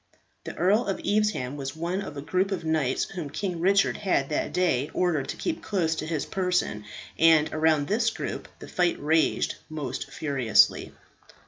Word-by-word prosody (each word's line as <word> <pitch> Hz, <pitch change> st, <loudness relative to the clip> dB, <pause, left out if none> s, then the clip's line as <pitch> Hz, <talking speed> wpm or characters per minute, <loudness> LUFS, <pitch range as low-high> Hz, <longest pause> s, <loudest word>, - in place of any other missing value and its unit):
The -, -, -6 dB
Earl 200 Hz, +7 st, +2 dB
of 195 Hz, -, -1 dB
Evesham 205 Hz, -11 st, 0 dB
was 135 Hz, 0 st, -5 dB
one 170 Hz, +4 st, -2 dB
of 155 Hz, -7 st, -7 dB
a 140 Hz, -, -5 dB
group 185 Hz, +5 st, 0 dB
of 180 Hz, -4 st, -2 dB
knights 155 Hz, -5 st, +1 dB
whom 170 Hz, -6 st, -5 dB
King 180 Hz, +3 st, -3 dB
Richard 195 Hz, +3 st, +3 dB
had 180 Hz, -9 st, 0 dB
that 150 Hz, -, -1 dB
day 150 Hz, -7 st, +1 dB
ordered 165 Hz, -7 st, +1 dB
to -, -, -4 dB
keep 330 Hz, -2 st, -3 dB
close 170 Hz, -6 st, 0 dB
to 155 Hz, -, -4 dB
his 160 Hz, -3 st, -2 dB
person, 180 Hz, -, -1 dB, 0.3 s
and 160 Hz, -2 st, +5 dB
around 155 Hz, -2 st, +2 dB
this 225 Hz, +2 st, +2 dB
group -, -, -5 dB
the -, -, -11 dB
fight 175 Hz, -1 st, +1 dB
raged 160 Hz, +2 st, +1 dB
most 140 Hz, -5 st, -5 dB
furiously. 135 Hz, -8 st, +2 dB
165 Hz, 175 wpm, -26 LUFS, 145-190 Hz, 0.3 s, and